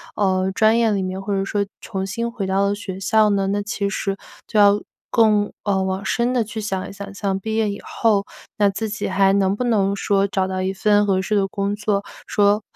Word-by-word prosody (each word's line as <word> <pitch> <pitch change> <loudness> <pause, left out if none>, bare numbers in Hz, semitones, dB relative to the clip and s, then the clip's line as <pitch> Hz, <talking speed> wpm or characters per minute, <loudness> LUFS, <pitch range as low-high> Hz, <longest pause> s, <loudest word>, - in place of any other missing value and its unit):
呃， 190 -1 +1
专 220 +3 +4
业 230 -2 +3
里 200 -2 0
面， 185 0 -3
或 200 +1 -3
者 195 - 0
说 200 +1 -1 0.2
重 190 0 -4
新 235 +5 -3
回 205 -4 -4
到 190 +1 +1
了 200 - 0
学 195 -2 -7
校 215 +1 +3
呢， 195 -1 +1
那 205 +1 -1
其 200 -1 -2
实 195 0 -2 0.3
就 215 - 0
要 205 0 +6 0.3
更， 210 -3 +3
呃， 195 -2 +1
往 190 +1 -2
深 240 +4 0
的 245 -3 +2
去 220 +1 -6
想 195 -3 -3
一 - - -9
想。 200 0 -8
像 195 -1 -2
毕 220 +2 -3
业 220 -2 +1
以 200 +1 -5
后 210 -3 +1 0.3
那 205 -1 +4
自 215 +3 -3
己 215 - -3
还 195 +1 +3
能 195 0 +2
不 250 - -2
能 200 -5 +1
说 200 0 +1
找 190 -1 0
到 185 0 -3
一 190 +1 -1
份 205 +1 +3
合 190 -2 +1
适 210 +3 -1
的 195 - +2
工 200 +1 -2
作， 210 -1 -1 0.2
说 205 0 +3
200 Hz, 250 characters per minute, -21 LUFS, 195-210 Hz, 0.3 s, 要